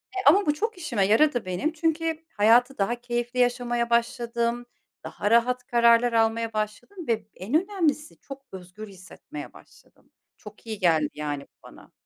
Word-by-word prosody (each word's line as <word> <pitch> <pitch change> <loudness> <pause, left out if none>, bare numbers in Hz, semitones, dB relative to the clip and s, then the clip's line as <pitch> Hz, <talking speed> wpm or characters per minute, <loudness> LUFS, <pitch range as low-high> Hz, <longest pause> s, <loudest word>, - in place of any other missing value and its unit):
Eee, 380 - -2
ama 390 +7 +6
bu 295 - +2
çok 440 +7 -3
işime 245 - 0
yaradı 245 +2 +3
benim. 185 - -2
Çünkü 325 0 -1
hayatı 240 +5 +4
daha 205 +4 0
keyifli 240 +1 -4
yaşamaya 240 -1 +1
başladım, 235 0 0 0.4
daha 205 - -3
rahat 245 +2 +3
kararlar 235 0 +4
almaya 225 0 +1
başladım 215 - -5
ve 220 -3 -1
en 195 +8 -8
önemlisi 330 -6 -2
çok 275 0 -11
özgür 190 +3 -10
hissetmeye 185 -6 -11
başladım. - - -21 0.3
Çok 210 0 -14
iyi 220 -2 -5
geldi, 160 -5 +2
yani, 145 -2 -4
bu - - -43
bana. - - -16
235 Hz, 155 wpm, -25 LUFS, 215-275 Hz, 0.4 s, ama